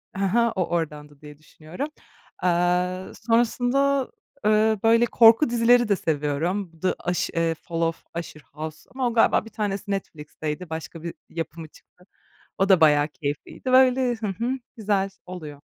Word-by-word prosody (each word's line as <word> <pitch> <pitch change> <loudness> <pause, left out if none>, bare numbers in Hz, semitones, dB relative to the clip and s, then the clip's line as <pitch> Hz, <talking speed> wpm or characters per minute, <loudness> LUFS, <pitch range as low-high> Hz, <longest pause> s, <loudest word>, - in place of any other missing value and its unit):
"Hı 195 - -2
hı, 235 +4 +2
o, 185 -2 +1
oradandı." 150 -4 -4
diye 150 -1 -12
düşünüyorum. 160 - -7 0.5
Aaa, 180 +1 0
sonrasında, 245 +4 +1 0.4
ııı, 215 0 +3
böyle, 230 +1 +5
korku 230 +3 +6
dizileri 240 0 +4
de 200 - +4
seviyorum 165 +3 -2
The 185 - 0
Ush 180 - 0
eee, 165 -1 0
Fall 165 +1 -5
of 165 0 -1 0.2
Usher 155 -2 -9
House 155 +1 -8
ama 260 -1 0
o 235 - -2
galiba 225 -1 +3
bir 225 - -10
tanesi 205 -1 -3
Netflix'teydi 155 -2 -5
başka 160 0 -7
bir 170 - -5 0.2
yapımı 165 -1 -6
çıktı. 180 +3 -23 0.5
O 195 +1 +1
da 185 -3 +6
bayağı 150 -1 +5
keyifliydi. 150 - -5
Böyle 255 -1 +5
Hı 220 -1 -4
hı, 230 +6 -2 0.3
güzel 200 -3 0 0.2
oluyor. 155 -6 -9
185 Hz, 150 wpm, -24 LUFS, 160-230 Hz, 0.5 s, korku